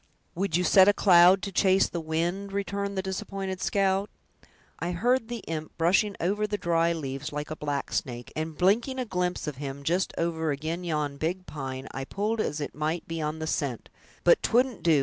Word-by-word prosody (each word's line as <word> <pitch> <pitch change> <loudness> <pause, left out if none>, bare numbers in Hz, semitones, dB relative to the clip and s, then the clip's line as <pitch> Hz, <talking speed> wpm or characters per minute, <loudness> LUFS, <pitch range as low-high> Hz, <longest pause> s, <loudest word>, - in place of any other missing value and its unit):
"Would 180 -2 0
you 180 - +1
set 190 +1 +6
a 205 - +6
cloud 185 0 +6
to 200 - -3
chase 190 0 +4
the 170 - -4
wind?" 170 +5 -2
returned 200 0 -2
the 190 - 0
disappointed 190 0 -4
scout; 195 0 +1 0.7
"I 175 +2 -2
heard 240 +6 +1
the 240 -2 -5
imp 155 -1 -5
brushing 190 +5 +3
over 205 +5 0
the 205 0 -2
dry 170 -2 +2
leaves, 145 -2 -4
like 150 +1 -5
a - - -2
black 145 -2 -3
snake, 120 -1 -3
and 155 0 -4
blinking 225 +8 +2
a 255 - -1
glimpse 180 -4 -2
of 150 -4 -5
him, 140 0 -6
just 175 +6 +1
over 160 -2 0
ag'in 160 +5 -3
yon 150 -4 -2
big 180 +5 -2
pine, 135 -4 -6
I 135 0 -5
pulled 215 +7 -1
as 150 -5 -2
it 145 - -4
might 155 +3 -2
be 165 -1 -3
on 155 +1 -2
the 160 - -4
scent; 140 -6 -2 0.3
but 175 - +5
'twouldn't 245 -1 +2
do! 160 -4 +4
175 Hz, 200 wpm, -27 LUFS, 155-195 Hz, 0.7 s, set